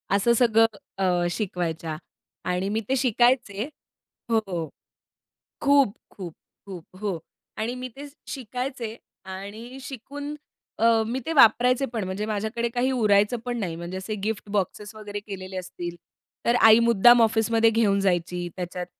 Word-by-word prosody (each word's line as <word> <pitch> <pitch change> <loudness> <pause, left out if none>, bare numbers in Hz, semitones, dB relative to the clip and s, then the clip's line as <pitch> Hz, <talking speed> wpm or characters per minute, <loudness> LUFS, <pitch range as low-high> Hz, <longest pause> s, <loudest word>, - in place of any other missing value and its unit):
असं 220 +4 +3
सगळं 225 -2 +5 0.3
अ, 180 -2 +1
शिकवायच्या 170 -5 -3 0.5
आणि 180 +2 -1
मी 215 +2 0
ते 265 - +3
शिकायचे 240 -3 +2 0.6
हो. 195 -8 0 0.9
खूप, 280 -6 +4 0.2
खूप, 175 -5 -8 0.3
खूप 185 -2 -10
हो, 200 -5 -2 0.4
आणि 225 +3 -2
मी 255 0 -6
ते 285 - -8 0.2
शिकायचे 250 -2 -5 0.3
आणि 205 +7 -8
शिकून 285 +3 -7 0.5
अ, 225 -1 +4
मी 240 +4 -2
ते 325 - -1
वापरायचे 250 +1 +5
पण 225 -4 -2
म्हणजे 190 +3 -3
माझ्याकडे 220 +3 -2
काही 250 +2 +1
उरायचं 210 -2 +3
पण 245 -1 -2
नाही. 175 -7 -3
म्हणजे 170 +2 -6
असे 190 +3 -4
गिफ्ट 215 -1 -3
बॉक्सेस 205 +1 -2
वगैरे 205 -1 -6
केलेले 190 -2 -8
असतील, 175 -1 -6 0.5
तर 235 - +4
आई 220 0 +8
मुद्दाम 235 +1 +6
ऑफिसमध्ये 225 0 +3
घेऊन 215 -3 +2
जायची. 175 -2 0
त्याच्यात 180 0 -4
215 Hz, 140 wpm, -25 LUFS, 190-240 Hz, 0.9 s, आई